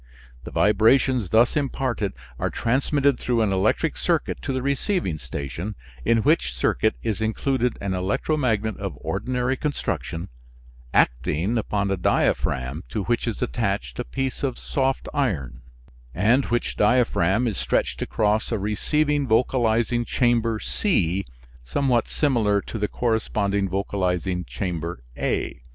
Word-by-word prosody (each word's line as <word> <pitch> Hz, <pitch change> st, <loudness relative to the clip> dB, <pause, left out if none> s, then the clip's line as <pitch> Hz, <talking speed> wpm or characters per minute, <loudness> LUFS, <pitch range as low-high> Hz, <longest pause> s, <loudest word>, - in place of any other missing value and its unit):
The -, -, -5 dB
vibrations 110 Hz, +1 st, +3 dB
thus 115 Hz, +2 st, +4 dB
imparted 130 Hz, -7 st, -1 dB, 0.3 s
are -, -, 0 dB
transmitted 140 Hz, +3 st, +1 dB
through 120 Hz, -2 st, +1 dB
an 100 Hz, -3 st, +1 dB
electric 95 Hz, 0 st, +1 dB
circuit -, -, 0 dB
to -, -, -3 dB
the 130 Hz, -1 st, -2 dB
receiving 140 Hz, -, 0 dB
station, 70 Hz, -, -5 dB, 0.3 s
in 115 Hz, -, +3 dB
which 60 Hz, -7 st, +2 dB
circuit 60 Hz, -, +1 dB
is 110 Hz, -1 st, -1 dB
included 125 Hz, +3 st, 0 dB
an 100 Hz, -1 st, -1 dB
electromagnet 110 Hz, +2 st, 0 dB
of 95 Hz, -7 st, -5 dB
ordinary 125 Hz, +1 st, -1 dB
construction, 125 Hz, -, -3 dB, 0.6 s
acting 75 Hz, -, +2 dB
upon 100 Hz, -3 st, 0 dB
a 95 Hz, -, +1 dB
diaphragm 70 Hz, -3 st, 0 dB
to 105 Hz, -, -2 dB
which 120 Hz, +3 st, 0 dB
is 115 Hz, -, -2 dB
attached -, -, -2 dB
a -, -, 0 dB
piece 130 Hz, -, -3 dB
of 130 Hz, -3 st, -1 dB
soft 135 Hz, -1 st, -1 dB
iron, 70 Hz, -, -1 dB, 0.5 s
and 120 Hz, -, +3 dB
which 120 Hz, 0 st, -1 dB
diaphragm 115 Hz, -2 st, +3 dB
is 105 Hz, -, -2 dB
stretched -, -, 0 dB
across 110 Hz, +1 st, 0 dB
a 115 Hz, -, +1 dB
receiving 145 Hz, +8 st, 0 dB
vocalizing 120 Hz, 0 st, +2 dB
chamber 115 Hz, -2 st, +1 dB
C, 95 Hz, -, 0 dB, 0.4 s
somewhat 120 Hz, -, +1 dB
similar 115 Hz, -8 st, +2 dB
to 110 Hz, -, -6 dB
the 105 Hz, -, +1 dB
corresponding 100 Hz, -4 st, 0 dB
vocalizing 90 Hz, -2 st, -1 dB
chamber 85 Hz, -, -4 dB
A. -, -, -2 dB
110 Hz, 130 wpm, -24 LUFS, 95-125 Hz, 0.6 s, thus